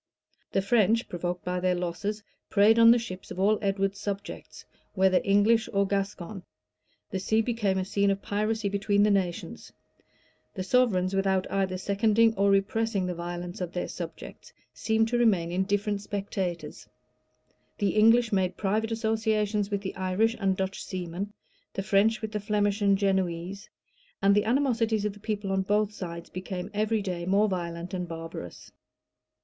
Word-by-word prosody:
The 195 Hz, -, +1 dB
French, 225 Hz, +1 st, +3 dB
provoked 175 Hz, 0 st, -4 dB
by 180 Hz, 0 st, -1 dB
their 180 Hz, 0 st, +1 dB
losses, 180 Hz, +4 st, -3 dB, 0.3 s
preyed 215 Hz, +3 st, +5 dB
on 230 Hz, 0 st, +8 dB
the 235 Hz, -, +7 dB
ships 200 Hz, -6 st, -7 dB
of -, -, -7 dB
all 210 Hz, +2 st, +3 dB
Edward's 195 Hz, 0 st, 0 dB
subjects, 200 Hz, -1 st, -6 dB, 0.3 s
whether 190 Hz, -1 st, +4 dB
English 215 Hz, +3 st, +3 dB
or 200 Hz, 0 st, +3 dB
Gascon: 195 Hz, -1 st, -3 dB, 0.7 s
the 190 Hz, -, -2 dB
sea 220 Hz, +4 st, +1 dB
became 215 Hz, -5 st, 0 dB
a 185 Hz, -, -1 dB
scene 200 Hz, +1 st, +1 dB
of 195 Hz, 0 st, 0 dB
piracy 215 Hz, +2 st, -1 dB
between 200 Hz, 0 st, +1 dB
the 210 Hz, -, +4 dB
nations: 185 Hz, -4 st, -2 dB, 0.8 s
the 185 Hz, -, -3 dB
sovereigns, 190 Hz, -4 st, +2 dB
without 190 Hz, -1 st, +1 dB
either 190 Hz, -1 st, 0 dB
seconding 220 Hz, +4 st, +3 dB
or 200 Hz, -1 st, +2 dB
repressing 200 Hz, +1 st, +1 dB
the 180 Hz, -, -2 dB
violence 175 Hz, +1 st, -6 dB
of 180 Hz, -1 st, -4 dB
their 180 Hz, -, -2 dB
subjects, -, -, -8 dB, 0.2 s
seemed 220 Hz, 0 st, +1 dB
to 240 Hz, 0 st, +1 dB
remain 190 Hz, -8 st, +2 dB
indifferent 200 Hz, +2 st, 0 dB
spectators: 190 Hz, -5 st, -4 dB, 0.9 s
the 205 Hz, -2 st, +1 dB
English 225 Hz, +2 st, +4 dB
made 185 Hz, -2 st, +1 dB
private 215 Hz, +3 st, 0 dB
associations 220 Hz, -2 st, 0 dB
with 200 Hz, -1 st, -2 dB
the 190 Hz, -, -5 dB
Irish 190 Hz, +5 st, +1 dB
and 190 Hz, -2 st, +1 dB
Dutch 190 Hz, 0 st, -3 dB
seamen; 185 Hz, +2 st, -5 dB, 0.4 s
the 195 Hz, -, -3 dB
French 215 Hz, +3 st, +2 dB
with 220 Hz, -, -3 dB
the 210 Hz, -, -2 dB
Flemish 205 Hz, 0 st, 0 dB
and 200 Hz, -1 st, +4 dB
Genoese;[] 190 Hz, 0 st, -1 dB, 0.5 s
and 200 Hz, 0 st, +4 dB
the 205 Hz, +1 st, +2 dB
animosities 230 Hz, -4 st, +1 dB
of 210 Hz, -, -1 dB
the 205 Hz, -, -15 dB
people 205 Hz, -2 st, -3 dB
on 195 Hz, 0 st, +1 dB
both 210 Hz, +2 st, +1 dB
sides 170 Hz, -3 st, -7 dB
became 185 Hz, +1 st, -5 dB
every 215 Hz, 0 st, 0 dB
day 180 Hz, -3 st, -3 dB
more 200 Hz, +3 st, +3 dB
violent 175 Hz, -1 st, -4 dB
and 180 Hz, -1 st, -3 dB
barbarous. 165 Hz, -, -8 dB
200 Hz, 160 wpm, -27 LUFS, 185-215 Hz, 0.9 s, on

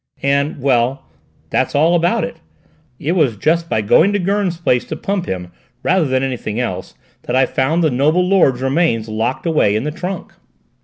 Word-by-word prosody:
And 140 Hz, +2 st, 0 dB
well, 130 Hz, 0 st, +1 dB, 0.5 s
that's -, -, 0 dB
all 160 Hz, +4 st, +4 dB
about 175 Hz, 0 st, +2 dB
it. -, -, -5 dB, 0.6 s
It 150 Hz, -, -2 dB
was 150 Hz, -, +1 dB
just 165 Hz, +8 st, 0 dB
by 110 Hz, -, +1 dB
going 160 Hz, -, +4 dB
to 205 Hz, -, +1 dB
Gurn's 195 Hz, -1 st, 0 dB
place 125 Hz, -8 st, +1 dB
to -, -, -5 dB
pump 195 Hz, -2 st, -3 dB
him, 90 Hz, -1 st, -5 dB, 0.3 s
rather 185 Hz, -2 st, +2 dB
than 130 Hz, -1 st, 0 dB
anything 120 Hz, -4 st, -3 dB
else, 95 Hz, -7 st, -4 dB, 0.3 s
that 125 Hz, -, -2 dB
I 130 Hz, 0 st, +4 dB
found 150 Hz, +7 st, 0 dB
the 155 Hz, -, +2 dB
noble 155 Hz, +8 st, +2 dB
lord's 135 Hz, -10 st, +3 dB
remains 135 Hz, -5 st, +1 dB
locked 110 Hz, +7 st, -2 dB
away 150 Hz, -11 st, +2 dB
in 110 Hz, -, -1 dB
the 150 Hz, -, -2 dB
trunk." 180 Hz, +3 st, -6 dB
140 Hz, 185 wpm, -18 LUFS, 125-170 Hz, 0.6 s, all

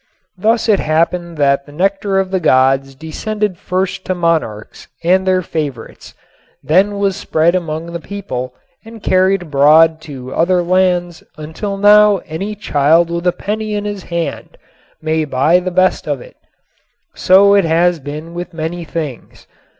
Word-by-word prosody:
Thus 220 Hz, +5 st, +1 dB
it 210 Hz, -3 st, +3 dB
happened 170 Hz, +2 st, -1 dB
that 140 Hz, -1 st, +1 dB
the -, -, -13 dB
nectar 195 Hz, +4 st, 0 dB
of 190 Hz, -1 st, 0 dB
the 190 Hz, -, 0 dB
gods 135 Hz, -2 st, +2 dB
descended 195 Hz, +6 st, -4 dB
first 185 Hz, 0 st, -2 dB
to 185 Hz, -, -1 dB
monarchs 160 Hz, -12 st, -2 dB, 0.2 s
and 190 Hz, +2 st, +2 dB
their 185 Hz, -1 st, +2 dB
favorites, 145 Hz, -8 st, -6 dB, 0.5 s
then 195 Hz, +6 st, +2 dB
was 200 Hz, -1 st, 0 dB
spread 165 Hz, -2 st, +1 dB
among 165 Hz, -2 st, -3 dB
the 170 Hz, -, -4 dB
people 130 Hz, -11 st, -6 dB, 0.3 s
and 225 Hz, -1 st, -13 dB
carried 185 Hz, 0 st, +2 dB
abroad 155 Hz, +2 st, +4 dB
to 130 Hz, -4 st, -9 dB
other 175 Hz, +1 st, +1 dB
lands 175 Hz, -2 st, 0 dB
until 160 Hz, +7 st, -5 dB
now 210 Hz, 0 st, +6 dB
any 195 Hz, +7 st, -5 dB
child 165 Hz, -2 st, +2 dB
with 170 Hz, +1 st, -2 dB
a -, -, +4 dB
penny 215 Hz, +3 st, -4 dB
in 205 Hz, 0 st, -3 dB
his 205 Hz, -3 st, -5 dB
hand 170 Hz, -1 st, -5 dB, 0.5 s
may 160 Hz, 0 st, 0 dB
buy 140 Hz, +2 st, 0 dB
of -, -, -12 dB
the -, -, 0 dB
best 185 Hz, +1 st, +1 dB
of -, -, -2 dB
it. -, -, -14 dB, 0.8 s
So 200 Hz, +2 st, +5 dB
it 200 Hz, -3 st, +4 dB
has 170 Hz, +1 st, +2 dB
been 150 Hz, +4 st, -8 dB
with 175 Hz, 0 st, -7 dB
many 165 Hz, +2 st, -4 dB
things. 155 Hz, -5 st, -7 dB
175 Hz, 160 wpm, -16 LUFS, 155-195 Hz, 0.8 s, now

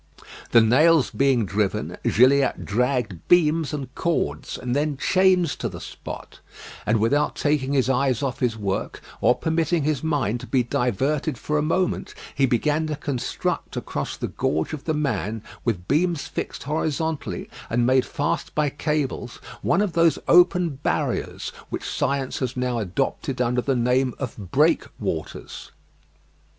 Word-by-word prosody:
The 115 Hz, -, +6 dB
nails 150 Hz, +7 st, +4 dB
being 135 Hz, -5 st, +2 dB
driven, 100 Hz, +1 st, -1 dB
Gilliatt 135 Hz, +3 st, +3 dB
dragged 120 Hz, -4 st, 0 dB
beams 165 Hz, -3 st, +4 dB
and 135 Hz, -4 st, -5 dB
cords, 75 Hz, -, -1 dB
and 125 Hz, 0 st, -2 dB
then 145 Hz, -1 st, 0 dB
chains 185 Hz, +1 st, +3 dB
to -, -, -2 dB
the -, -, -8 dB
spot; -, -, -9 dB, 0.5 s
and 110 Hz, +1 st, +3 dB
without 145 Hz, +7 st, +2 dB
taking 145 Hz, -2 st, 0 dB
his 130 Hz, -4 st, +2 dB
eyes 135 Hz, 0 st, +1 dB
off 130 Hz, -3 st, -2 dB
his 120 Hz, -3 st, 0 dB
work, 100 Hz, -3 st, -3 dB, 0.2 s
or 125 Hz, -, +5 dB
permitting 160 Hz, 0 st, 0 dB
his 150 Hz, -2 st, 0 dB
mind 135 Hz, -8 st, 0 dB
to -, -, -9 dB
be 130 Hz, -2 st, +2 dB
diverted 130 Hz, +2 st, 0 dB
for 150 Hz, +5 st, -1 dB
a -, -, +1 dB
moment, 170 Hz, +4 st, -1 dB, 0.2 s
he 135 Hz, -1 st, +2 dB
began 150 Hz, +6 st, +1 dB
to 155 Hz, -, -2 dB
construct 140 Hz, -4 st, -3 dB
across -, -, -4 dB
the -, -, -3 dB
gorge 80 Hz, -, -1 dB
of 145 Hz, -3 st, -6 dB
"The 160 Hz, -, 0 dB
Man" 115 Hz, -7 st, -2 dB, 0.2 s
with 95 Hz, -7 st, -2 dB
beams 165 Hz, +1 st, +1 dB
fixed -, -, -5 dB
horizontally, 155 Hz, +1 st, -2 dB, 0.2 s
and 120 Hz, +1 st, +2 dB
made 130 Hz, +1 st, +4 dB
fast 145 Hz, -, -2 dB
by 150 Hz, -2 st, +1 dB
cables, 145 Hz, -4 st, -2 dB, 0.3 s
one 175 Hz, +2 st, +2 dB
of 195 Hz, -5 st, -2 dB
those 165 Hz, 0 st, +4 dB
open 175 Hz, -3 st, +4 dB
barriers -, -, -1 dB, 0.2 s
which -, -, -4 dB
science 135 Hz, -1 st, -1 dB
has 130 Hz, -1 st, -3 dB
now 125 Hz, -1 st, 0 dB
adopted 125 Hz, +5 st, -2 dB
under 125 Hz, 0 st, +1 dB
the 135 Hz, +1 st, 0 dB
name 125 Hz, +1 st, +1 dB
of 130 Hz, -4 st, -4 dB
breakwaters. -, -, -1 dB
135 Hz, 150 wpm, -24 LUFS, 120-155 Hz, 0.5 s, The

